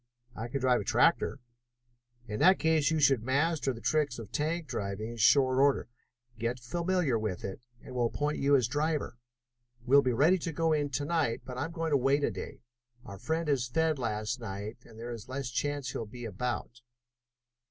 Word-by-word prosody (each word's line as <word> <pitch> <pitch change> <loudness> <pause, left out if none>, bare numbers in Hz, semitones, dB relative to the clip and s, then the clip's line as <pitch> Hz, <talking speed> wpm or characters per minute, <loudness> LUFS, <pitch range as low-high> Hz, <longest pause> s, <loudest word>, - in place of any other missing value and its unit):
"I 115 - -4
can 135 +3 -3
drive 125 -2 +3
a - - -5
tractor." 130 +12 +2 0.9
"In 105 -1 -4
that 185 +1 +6
case 160 -3 +2
you 160 0 +1
should 135 -5 +4
master 140 +4 +1
the 115 -2 -8
tricks 140 +2 +1
of 110 -4 -9
tank 160 +3 -1
driving 105 -2 -4
in 120 - -8
short 130 +3 +4
order. 140 -2 +3 0.5
Get 120 +2 -2
familiar 170 0 0
with 105 -5 -3
it 95 +3 -6 0.2
and 130 - -10
we'll 120 -1 +1
appoint 145 +5 -2
you 140 +1 +4
as 125 -5 +3
driver. 145 -2 -1 0.7
We'll 140 +3 +6
be 130 - +1
ready 160 +10 +4
to 165 - -3
go 165 +1 +1
in 145 -1 0
to 140 +2 -2
night, 155 -7 0
but 125 -1 -6
I 145 - 0
am 165 - -7
going 165 -1 -3
to 145 - +5
wait 140 +2 +2
a - - +1
day. - - -8 0.4
Our 100 -5 -9
friend 160 +6 -2
was 135 -4 +1
fed 160 +2 +1
last 110 0 -2
night, 105 0 -6
and 110 - -15
there 120 +2 -6
is 115 0 -8
less 130 -1 -4
chance 140 +2 -2
he'll 115 - -4
be 120 +2 -8
about." 120 +2 -4
130 Hz, 200 wpm, -30 LUFS, 115-150 Hz, 0.9 s, that